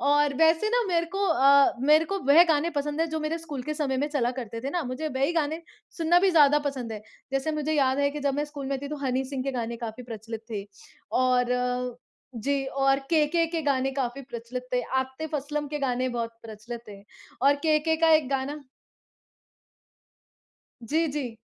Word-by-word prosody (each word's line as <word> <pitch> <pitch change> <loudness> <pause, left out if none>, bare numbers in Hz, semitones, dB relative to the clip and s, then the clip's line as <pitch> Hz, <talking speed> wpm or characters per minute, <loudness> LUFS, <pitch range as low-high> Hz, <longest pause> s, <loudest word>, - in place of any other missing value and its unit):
और 290 0 +3
वैसे 325 +5 +4
ना - - +3
मेरे 340 -1 +1
को 400 +1 +1
अ, 280 -3 +5
मेरे 305 +4 +5
को 395 +4 -2
वह 305 +5 +8
गाने 320 +2 +2
पसंद 295 +1 -2
हैं, 330 - +1
जो 315 0 -2
मेरे 315 +2 -2
स्कूल 295 -6 -6
के 305 +3 -3
समय 280 -4 -1
में 290 +3 0
चला 255 -5 0
करते 230 -1 -5
थे 275 +3 -4
ना। 350 +1 -1
मुझे 310 +4 -3
वही 270 +4 0
गाने 320 0 -1 0.3
सुनना 335 +1 +4
भी 385 -1 +4
ज़्यादा 295 -3 +6
पसंद 250 -5 -5
है। 215 - -7 0.3
जैसे 270 +3 0
मुझे 305 0 -1
याद 270 -2 +2
है 285 0 +2
कि 295 0 -6
जब 280 -1 0
मैं 290 +1 0
स्कूल 290 -2 -7
में 275 0 -1
थी 280 - -4
तो 300 - -4
हनी 260 +1 0
सिंह 265 -1 -4
के 275 - -1
गाने 235 -2 -3
काफ़ी 230 +1 -6
प्रचलित 225 -1 -7
थे 205 -3 -4 0.6
और 250 0 0 0.4
जी, 275 +4 -1
और 270 0 +2
केके 325 +1 +3
के 330 - 0
गाने 270 -2 +1
काफ़ी 265 0 -2
प्रचलित 250 0 -7
थे। 250 - +2 0.2
आतिफ़ 265 +4 -4
असलम 295 +1 -3
के 295 0 -3
गाने 255 -2 0
बहुत 235 -2 -3
प्रचलित 225 +2 -8
थे 200 -1 -11 0.4
और 280 +1 +6
केके 315 +1 +2
का 330 - +5
एक 305 -4 +2
गाना 275 +2 -2 2.2
जी, 315 +8 +1
जी। 270 -6 -4
280 Hz, 200 wpm, -26 LUFS, 250-305 Hz, 2.2 s, वह